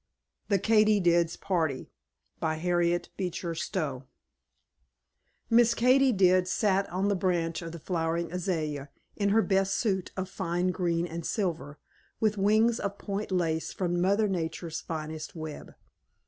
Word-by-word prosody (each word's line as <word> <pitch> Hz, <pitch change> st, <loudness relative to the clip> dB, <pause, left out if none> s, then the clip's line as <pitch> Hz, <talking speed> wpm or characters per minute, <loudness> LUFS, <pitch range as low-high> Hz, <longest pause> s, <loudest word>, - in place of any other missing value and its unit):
THE 200 Hz, -, +4 dB
KATY 215 Hz, +1 st, +4 dB
DID'S 170 Hz, -2 st, +2 dB
PARTY 160 Hz, -8 st, -1 dB, 0.5 s
By 160 Hz, 0 st, 0 dB
Harriet 175 Hz, +1 st, 0 dB
Beecher 180 Hz, -2 st, -3 dB
Stowe 155 Hz, -6 st, -3 dB, 1.4 s
Miss 235 Hz, 0 st, +4 dB
Katy 255 Hz, +3 st, +4 dB
did 185 Hz, -3 st, +4 dB
sat 195 Hz, 0 st, +1 dB
on 190 Hz, +3 st, -1 dB
the 200 Hz, -, +2 dB
branch 175 Hz, -3 st, 0 dB
of 165 Hz, 0 st, -7 dB
a -, -, -6 dB
flowering 165 Hz, 0 st, -2 dB
azalea, 155 Hz, -6 st, -2 dB, 0.3 s
in 200 Hz, -1 st, +1 dB
her 220 Hz, +2 st, +4 dB
best 195 Hz, -1 st, +1 dB
suit 190 Hz, -6 st, -1 dB
of 190 Hz, 0 st, -2 dB
fine 180 Hz, -1 st, -1 dB
green 170 Hz, -1 st, 0 dB
and 170 Hz, 0 st, -6 dB
silver, 160 Hz, -7 st, -2 dB, 0.4 s
with 215 Hz, -1 st, +2 dB
wings 220 Hz, +4 st, +3 dB
of 200 Hz, 0 st, -3 dB
point 200 Hz, +1 st, -4 dB
lace 165 Hz, -3 st, 0 dB
from 175 Hz, -2 st, -1 dB
Mother 200 Hz, +4 st, +3 dB
Nature's 165 Hz, -3 st, -3 dB
finest 155 Hz, -1 st, -6 dB
web. 155 Hz, -2 st, -8 dB
180 Hz, 140 wpm, -28 LUFS, 165-200 Hz, 1.4 s, THE